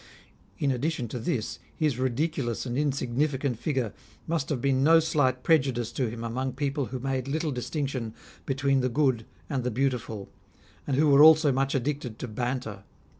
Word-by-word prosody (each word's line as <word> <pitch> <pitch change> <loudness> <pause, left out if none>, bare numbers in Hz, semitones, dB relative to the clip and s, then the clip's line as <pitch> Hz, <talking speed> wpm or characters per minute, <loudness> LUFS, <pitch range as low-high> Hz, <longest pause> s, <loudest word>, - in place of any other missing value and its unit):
In 140 - +1
addition 130 0 -1
to 125 - -4
this, 115 0 -2 0.2
his 150 -6 0
ridiculous* 130 -1 -1
and 120 -1 -3
insignifi 140 0 0
cant 130 -5 -2
figure 125 -6 -1 0.3
must 160 -4 -1
have 140 - -1
been 135 +1 +2
no 165 +2 +7
slight 145 -5 +1
prejudice 130 -7 +2
to 125 -4 -1
him 115 +1 -6
among 130 +3 -2
people 140 -1 -1
who 130 - -4
made 130 0 -2
little 155 +2 -1
distinction 130 -3 -3 0.3
between 135 0 +2
the 130 0 +1
good 130 -4 +1 0.2
and 135 -5 -2
the 125 - 0
beautiful, 120 -5 -2 0.6
and 135 -2 0
who 155 +1 +4
were 140 0 +6
also 155 -1 +8
much 135 +1 0
addicted 135 -3 -2
to 125 - -5
banter. 120 -2 -3
135 Hz, 175 wpm, -27 LUFS, 120-145 Hz, 0.6 s, also